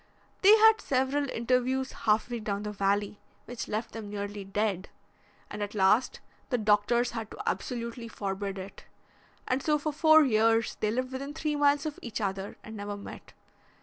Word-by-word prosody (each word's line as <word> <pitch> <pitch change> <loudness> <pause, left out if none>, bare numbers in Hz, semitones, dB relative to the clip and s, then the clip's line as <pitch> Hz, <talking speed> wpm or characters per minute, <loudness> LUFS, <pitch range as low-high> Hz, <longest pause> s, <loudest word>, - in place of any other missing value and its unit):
They 415 +3 +8
had 445 0 +6
several 270 +2 0
interviews 255 +3 0
half 215 -1 +1
way 240 - -2
down 205 -2 -3
the 210 - -4
valley, 200 0 0 0.3
which 245 -1 -6
left 215 +2 -3
them 220 -2 -7
nearly 205 0 -5
dead, 195 -1 -2 0.6
and 210 - -7
at 205 +1 -4
last, 210 +5 +2 0.3
the 245 - +1
doctors 220 +3 +2
had 225 -2 -5
to - - -8
absolutely 235 -1 -3
forbid 195 -2 -4
it. 190 +1 -9 0.6
And 255 +2 0
so 300 +1 +2
for 300 +1 -3
four 315 +1 +6
years 225 -2 +2
they 215 - +1
lived 255 +4 -2
within 275 +3 -5
three 305 -1 -1
miles 290 0 +3
of 305 -2 -4
each 235 -2 -5
other 195 -1 -3
and 220 - -9
never 205 0 -5
met. 200 - -11
225 Hz, 175 wpm, -29 LUFS, 205-265 Hz, 0.6 s, They